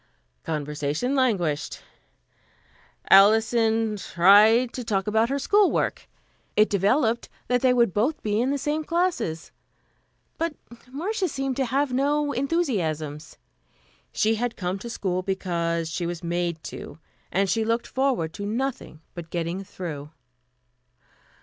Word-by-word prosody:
Conversation 150 - -2
languished. 195 - 0 1.3
Alison 220 +1 +4
tried 210 +7 +5
to 250 - -5
talk 200 -4 -1
about 220 +2 +2
her 275 - 0
school 405 +8 +3
work. - - -2 0.5
It 215 +1 +4
developed 220 +4 +1 0.2
that 250 -1 +1
they 255 - +4
would 235 -6 +3 0.3
be 210 +1 +1
in 255 - +1
the 285 - 0
same 295 +3 -2
classes; 335 - -1 0.9
but 330 -2 -1 0.4
Marcia 375 +7 -2
seemed 270 -3 -3
to 270 - +1
have 270 +2 0
no 290 +2 +1
enthusiasms. 175 - -2 0.7
She 220 +1 +2
had 245 -2 -2
come 185 +1 -3
to 235 - -7
school 185 -5 -2
because 170 -3 -2
she 170 +1 -2
was 175 0 -5
made 170 -1 -2
to, - - -8 0.3
and 195 +3 +1
she 225 +3 +1
looked 230 +2 0
forward 255 - -1
to 200 - -6
nothing 240 - -4
but 170 -2 -8
getting 170 +3 -3
through. 160 -7 -7
220 Hz, 130 wpm, -25 LUFS, 175-260 Hz, 1.3 s, tried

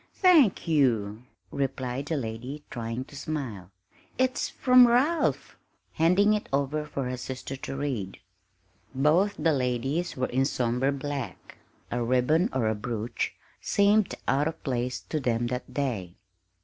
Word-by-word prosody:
"Thank 315 - +4
you," 115 -9 +2 0.3
replied 135 0 -3
the 160 - -1
lady, 125 +4 -5
trying 115 +1 -4
to 145 - -14
smile. 130 - -5 0.5
"It's 260 +1 +1
from 250 -1 +6
Ralph," 275 +8 +1 0.4
handing 180 +6 +4
it 210 - -2
over 140 +2 0
for 135 -3 -3
her 125 0 -3
sister 130 +1 -6
to 135 - -6
read. 130 -9 -3 0.8
Both 160 +9 +3
the 160 +1 +2
ladies 135 +6 -1
were 130 - +1
in 130 +2 +1
somber 125 0 0
black; 140 -7 -6 0.3
a 120 - -1
ribbon 130 - +2
or 115 -4 0
a 110 - +2
brooch 110 +1 -3 0.3
seemed 205 0 +3
out 140 +4 +2
of 160 - -6
place 125 -2 -2
to 155 - -3
them 120 -3 0
that 125 - -5
day. 110 -11 -3
135 Hz, 140 wpm, -27 LUFS, 120-160 Hz, 0.8 s, from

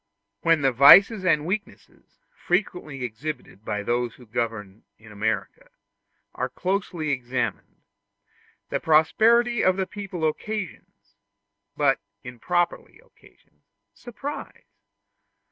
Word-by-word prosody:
When 165 +2 +2
the 135 - +4
vices 185 - +7
and 155 -5 +2
weaknesses, 200 +4 -6 0.2
frequently 175 -7 -2
exhibited 125 -2 -6
by 105 -1 -3
those 120 +1 -1
who 125 - -16
govern 110 -3 -4
in 110 -1 -16
America, 110 - -3 0.6
are - - -3
closely 180 -5 -2
examined, 125 -4 -4 0.9
the - - 0
prosperity 225 +10 +3
of 185 0 +3
the 190 - 0
people 185 -5 -4
occasions 155 - -6 0.6
but 140 -2 +2 0.2
improperly 175 - -2
occasions - - -25 0.3
surprise. 275 +5 -8
155 Hz, 100 wpm, -24 LUFS, 120-190 Hz, 0.9 s, vices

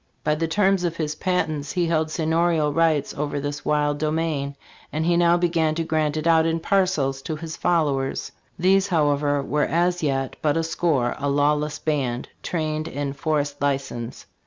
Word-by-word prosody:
By 150 - +2
the 165 +2 -1
terms 195 +1 +2
of 170 -2 -1
his 150 -2 -1
patent 155 -3 -1
he 180 -2 +1
held 160 -1 +1
seignorial 160 -1 +1
rights 160 -3 +2
over 145 0 -2
this 145 +1 -4
wild 145 -1 +1
domain; 155 -3 -1 0.4
and 155 +1 -1
he 175 0 +3
now 170 0 +4
began 165 -3 +1
to 165 - -1
grant 155 -1 0
it 155 - -3
out 165 -1 +4
in 165 0 0
parcels 165 -8 +1
to 155 - -4
his 160 +1 -6
followers. 145 -6 0 0.3
These, 190 +2 +3
however, 145 -4 +1
were 150 +2 +1
as 175 +1 +1
yet 135 -3 -1
but 150 0 +1
a 165 - +1
score; 160 -6 0
a 145 +1 -1
lawless 150 +1 +1
band, 135 -7 -2
trained 155 -2 -2
in 140 0 -3
forest 145 0 -1
license." 135 -4 -2
155 Hz, 175 wpm, -23 LUFS, 145-165 Hz, 0.4 s, now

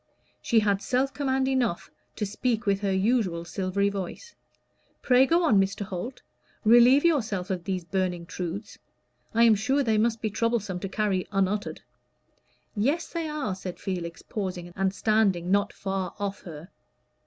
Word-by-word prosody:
She 225 -1 +3
had 200 -2 +1
self 260 +4 0
command 265 -2 0
enough 250 -9 -1 0.2
to 210 - -2
speak 225 +3 -1
with 200 -1 +2
her 200 -1 0
usual 190 -4 +1
silvery 195 +3 0
voice. 200 - -6 0.7
"Pray 255 +1 +5
go 340 +4 +3
on, 215 -12 +5
Mr. 195 +2 -2
Holt. 205 +6 -5 0.4
Relieve 240 +6 +6
yourself 215 - +1
of 180 -2 -3
these 185 -2 -2
burning 180 -1 -2
truths. 180 +4 -6 0.6
I 230 - +5
am 230 -1 +7
sure 265 +7 +1
they 220 -3 +2
must 225 +1 +1
be 215 -1 -2
troublesome 220 -4 -1
to 195 - -5
carry 195 -3 -1
unuttered." 195 +1 -1 0.9
"Yes, 280 +11 0
they 335 -2 -2
are," 295 -10 -2
said 185 -1 -7
Felix, 175 -3 -5
pausing, 180 -4 -5
and 195 -1 +1
standing 195 -4 +1
not 200 0 +2
far 190 -2 -4
off 200 -1 -4
her. 165 0 -9
205 Hz, 155 wpm, -27 LUFS, 185-235 Hz, 0.9 s, am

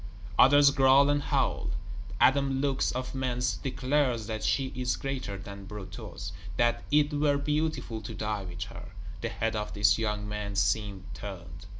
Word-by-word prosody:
Others 145 +1 +7
growl 135 +1 +5
and 145 0 +1
howl. - - 0 0.5
Adam 135 0 +4
Lux, 135 -1 +1
of 130 0 -4
Mentz, 125 -2 -1
declares 130 -3 0
that 110 0 -4
she 130 +5 0
is 125 -1 0
greater 130 -7 -4
than 100 +1 -9
Brutus; 95 -3 -7 0.3
that 120 0 +2
it 150 0 +3
were 145 -1 +2
beautiful 150 -6 -1
to 105 - -7
die 105 -1 -2
with 90 0 -5
her; 100 - -10 0.3
the - - -2
head 115 0 -2
of 105 0 -3
this 105 0 +3
young 105 -2 -1
man 105 -1 -4
seems 100 -2 0
turned. 90 -3 -8
120 Hz, 160 wpm, -29 LUFS, 105-135 Hz, 0.5 s, Others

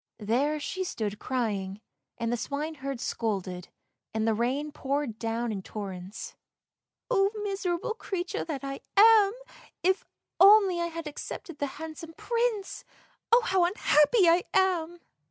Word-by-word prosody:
There 260 +8 0
she 375 +5 -3
stood 210 - -3
crying, 205 -6 -2 0.4
and 230 0 -1
the - - +2
swineherd 280 0 -4
scolded, 190 -7 -3 0.5
and 220 0 +1
the 225 - +3
rain 260 +7 -1
poured 275 -5 -2
down 230 +1 -2
in 200 -2 -4
torrents. 190 -1 -7 0.4
" - - -23
Oh, 390 -4 +4
miserable 390 0 -2
creature 370 -5 -3
that 300 -5 -4
I 275 0 -4 0.2
am! 425 -1 +7 0.5
if 375 +2 +2 0.4
only 390 -3 +7
I 340 - 0
had 330 -1 -6
accepted 300 +1 -7
the 285 - 0
handsome 320 +1 -8
Prince. 465 -4 -1 0.5
Oh, 475 +2 +7
how 375 -4 +2
unhappy 350 +1 +4
I 340 +2 +5
am! 350 -3 +1
300 Hz, 135 wpm, -28 LUFS, 230-375 Hz, 0.5 s, am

